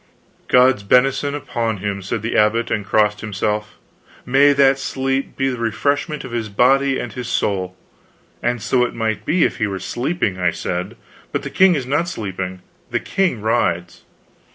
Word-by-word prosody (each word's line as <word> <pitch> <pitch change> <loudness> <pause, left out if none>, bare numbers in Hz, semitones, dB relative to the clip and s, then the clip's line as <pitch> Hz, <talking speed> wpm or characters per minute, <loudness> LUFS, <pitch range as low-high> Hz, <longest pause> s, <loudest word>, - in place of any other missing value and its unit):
"God's 125 -3 +4
benison 135 +6 +2
upon 120 -6 -2
him!" 100 0 -3
said 100 +3 -4
the 115 - -2
abbot, 110 +2 +2
and 105 - 0
crossed 105 +1 +1
himself; 105 0 -2 0.5
"may 135 +3 +5
that 135 -1 +4
sleep 135 0 -2
be 135 - 0
to 135 - +1
the 125 - -5
refreshment 140 +7 -1
of 130 - -8
his 115 -2 -3
body 135 +5 +3
and 120 - -5
his 125 -2 -5
soul." 95 -2 -1 0.6
"And 120 -2 -1
so 125 -2 +2
it 120 - -2
might 110 -3 -2
be, 170 0 +3
if - - 0
he 110 - 0
were 95 -1 -3
sleeping," 120 - -2
I 90 -1 +2
said, 90 +2 -4 0.3
"but - - -2
the - - -6
king 190 -2 +5
is 135 -4 -2
not 145 +6 0
sleeping, 95 - -5 0.3
the - - 0
king 185 - -1
rides." 90 -5 0
115 Hz, 175 wpm, -20 LUFS, 105-135 Hz, 0.6 s, may